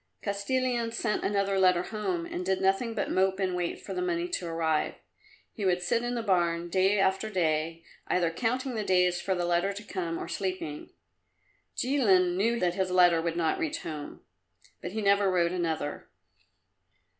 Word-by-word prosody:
Kostilin 235 +3 -1
sent 230 -2 -1
another 200 -1 +1
letter 180 -2 +4
home 190 -6 -3
and 180 - -4
did 190 +1 0
nothing 195 +5 +1
but 210 - -2
mope 190 +1 +2
and 185 -2 0
wait 175 -1 -2
for - - -7
the 360 - -2
money 350 -1 -1
to 185 - -3
arrive. 160 -2 0 0.6
He 215 - -6
would 180 -2 +1
sit 230 +6 +1
in 240 0 -2
the 235 - -2
barn 175 -4 +1
day 190 +3 +3
after 195 +2 +1
day, 165 -3 0 0.2
either 175 -2 +1
counting 250 +7 -1
the 220 -2 -2
days 180 -2 +2
for 190 - 0
the 175 -1 -1
letter 175 +3 +1
to 205 +2 -8
come 175 -5 -3
or - - -5
sleeping. 185 -6 -4 0.9
Jilin 195 -10 +3
knew 230 +5 +1
that 175 -1 +1
his 190 0 -1
letter 175 -2 +5
would 170 0 -2
not 165 -2 +1
reach 320 0 -2
home, 150 -3 -7 0.6
but 180 - -6
he 220 -1 -2
never 200 0 +4
wrote 175 -2 +2
another. 165 -5 -3
190 Hz, 180 wpm, -28 LUFS, 175-210 Hz, 0.9 s, letter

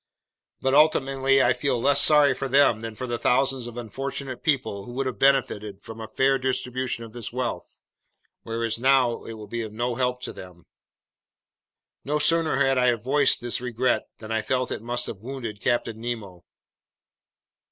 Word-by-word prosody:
But 130 0 +1
ultimately 135 -2 +3
I 120 - +4
feel 125 0 -1
less 140 +4 +5
sorry 150 -2 +6
for 135 - -4
them 135 -4 +4
than 115 -1 -6
for 130 - -5
the 120 -1 -3
thousands 130 -1 +1
of 120 0 -9
unfortunate 130 +2 -5
people 110 -10 -1
who 120 - -9
would 135 +2 -2
have 125 -6 -4
benefited 110 -7 +1
from 115 0 -9
a 110 - -6
fair 135 +4 +2
distribution 130 -1 -2
of 115 -1 -11
this 120 -3 -5
wealth, 125 0 -5 0.6
whereas 115 0 -3
now 130 -2 +3
it 115 - -7
will 110 -1 -9
be 115 +3 -4
of 110 -2 -6
no 120 +3 -2
help 125 0 -1
to - - -4
them!" 90 -2 -12 1.4
No 150 +2 -1
sooner 165 +1 +2
had 135 -1 +2
I 125 0 +4
voiced 130 +6 +2
this 120 0 -1
regret 125 0 0
than 110 0 -9
I 110 0 0
felt 130 +3 -1
it - - -4
must 120 +1 -1
have 100 - -7
wounded 115 -4 -6
Captain 115 -2 -1
Nemo. 105 -7 -6
125 Hz, 175 wpm, -25 LUFS, 115-135 Hz, 1.4 s, sorry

